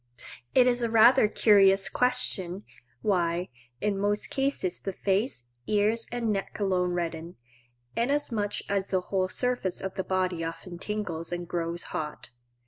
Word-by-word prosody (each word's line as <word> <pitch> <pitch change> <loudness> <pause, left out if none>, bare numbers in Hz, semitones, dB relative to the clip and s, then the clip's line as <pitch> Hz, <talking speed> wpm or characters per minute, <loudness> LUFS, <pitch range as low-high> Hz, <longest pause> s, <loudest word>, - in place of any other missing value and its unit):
It 255 - +7
is 245 -1 +2
a 235 - 0
rather 225 +1 +6
curious 195 -3 +5
question 200 -7 -1 0.4
why, 175 -3 +1 0.3
in 205 -2 0
most 205 +1 -1
cases 270 -10 -1
the 195 - -4
face, 195 - -1 0.2
ears, 215 +2 +1
and 235 -2 -1
neck 195 +1 -4
alone 180 -3 +1
redden, 170 0 -3 0.6
inasmuch 230 -5 -1
as 195 -1 0
the 185 -1 0
whole 185 0 -1
surface 245 -5 -1
of 190 -1 -4
the 190 - -3
body 185 -2 -1
often 170 +2 -6
tingles 180 -6 -4
and 175 0 -4
grows 170 0 -3
hot. 150 -3 -5
195 Hz, 140 wpm, -28 LUFS, 180-220 Hz, 0.6 s, It